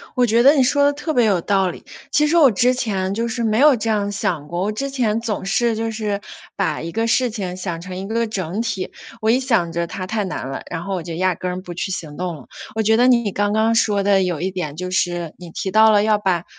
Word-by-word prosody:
我 250 -2 +3
觉 230 0 +3
得 280 +3 +8
你 270 - +4
说 285 +3 +3
的 285 - +3
特 305 +2 -3
别 245 -4 +3
有 195 -5 +2
道 195 0 +1
理， 175 - -9 0.3
其 300 +1 +3
实 320 +3 +2
我 295 -5 +7
之 245 +4 +2
前 195 -7 -2
就 230 +3 -1
是 235 +1 -3
没 220 0 +1
有 290 0 +6
这 225 -1 -3
样 205 -2 0
想 155 -7 -2
过， 175 +3 -3
我 210 - 0
之 275 +6 -3
前 235 -5 0
总 225 -2 -3
是 230 +4 +1
就 225 +1 -2
是 210 -2 -3 0.3
把 - - -1
一 165 - -5
个 225 0 0
事 245 +2 +2
情 190 -5 -5
想 175 -3 -4
成 185 +1 -7
一 190 +1 -5
个 230 +2 0
整 195 -2 -3
体。 195 -5 -3 0.3
我 220 - +1
一 250 +3 +3
想 220 -11 +1
着 170 0 -1
它 190 -3 -6
太 215 +1 -1
难 180 -8 -4
了， 135 - -5
然 165 -1 -4
后 195 - -2
我 175 - -4
就 170 0 -6
压 185 +1 +1
根 180 +2 -4
儿 180 +1 -5
不 180 -2 -8
去 175 +3 -3
行 155 -5 -5
动 175 -1 -4
了， 135 - -15 0.3
我 220 - +1
觉 220 +1 +3
得 245 +2 +4
你 235 -5 +3
刚 205 0 0
刚 220 +2 +2
说 205 -3 +2
的 195 -1 +3
有 175 -4 -2
一 185 +3 -2
点 155 -6 -5
就 180 +1 -4
是， 175 -3 -1
你 175 -1 -10
提 190 - -4
到 220 +2 +6
了 205 -1 +4
要 215 0 +3
把 185 -5 0
205 Hz, 295 characters per minute, -20 LUFS, 180-230 Hz, 0.3 s, 得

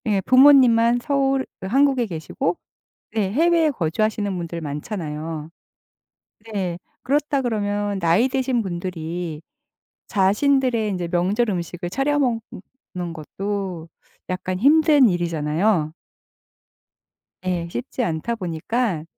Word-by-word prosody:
예 205 -2 +2
부모님만 250 -2 +6
서울 270 0 +1
그 190 - -6
한국에 265 +1 +3
계시고 165 0 -3 0.6
네 205 -4 0
해외에 325 +4 +3
거주하시는 205 - -1
분들 170 -1 -5
많잖아요. 155 0 -5 1.0
네. 185 -4 -2 0.2
그렇다 285 +1 +1
그러면 205 -4 -1
나이 175 +9 +3
드신 260 -2 0
분들이 175 -4 -4 0.7
자신들의 230 +3 +2
인제 180 -3 -3
명절 190 +7 +1
음식을 175 -1 -4
차려 275 +8 0
먹는 225 -7 -4
것도 185 +1 -5 0.4
약간 185 0 -3
힘든 295 - +5
일이잖아요. 165 -1 0 1.5
예. 175 -2 -1
쉽지 245 +5 -4
않다 170 +6 -2
보니까 185 0 -2
200 Hz, 240 characters per minute, -22 LUFS, 170-250 Hz, 1.5 s, 부모님만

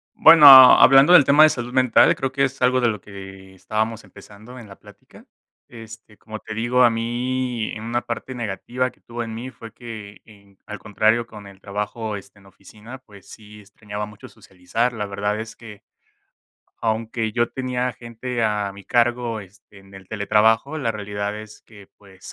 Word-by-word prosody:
Bueno, 160 -2 +7
hablando 135 +3 +8
del 150 -6 +7
tema 145 +3 +5
de 155 - +7
salud 120 -3 -5
mental, 130 -2 +3
creo 135 0 -4
que 140 +1 0
es 135 0 -4
algo 130 0 +2
de 120 - +1
lo 105 -3 -4
que 95 -1 -13
estábamos 110 +4 -4
empezando 105 +5 -15
en 110 -3 -13
la 100 - -14
plática. 105 0 -19 0.4
Este, 110 -2 -14
como 110 +1 -10
te 110 - -9
digo, 120 +3 0
a 120 - +5
mí 120 +1 -3
en 110 0 -9
una 120 +1 -2
parte 125 +2 -7
negativa 120 +3 -4
que - - -29
tuvo 120 0 -7
en 115 -1 -7
mí 125 +3 -8
fue 115 -3 -13
que 110 -4 -11
en 100 -3 -21
al 105 -1 -8
contrario 110 +3 0
con 105 -3 -13
el 95 -1 -16
trabajo, 105 +2 -5
este, 100 0 -14
en 100 - -22
oficina 105 +6 -14
pues, 100 -6 -19
sí 105 -1 -14
extrañaba 105 0 -8
mucho 105 -1 -14
socializar 110 +7 -4
la 105 -2 -4
verdad 105 +1 -3
es 110 0 -8
que, 105 -3 -14 1.0
aunque 110 0 -3
yo 120 0 -1
tenía 125 -1 -3
gente 120 +1 -6
a 105 -2 -2
mi 100 0 -14
cargo, 120 -2 -1
este, 100 +1 -18
en 95 0 -20
el 95 -1 -14
teletrabajo, 110 +6 +1
la 115 -6 -2
realidad 105 0 -5
es 105 0 -13
que, 100 -3 -18
pues, 95 -2 -20
110 Hz, 185 wpm, -21 LUFS, 105-120 Hz, 1.0 s, hablando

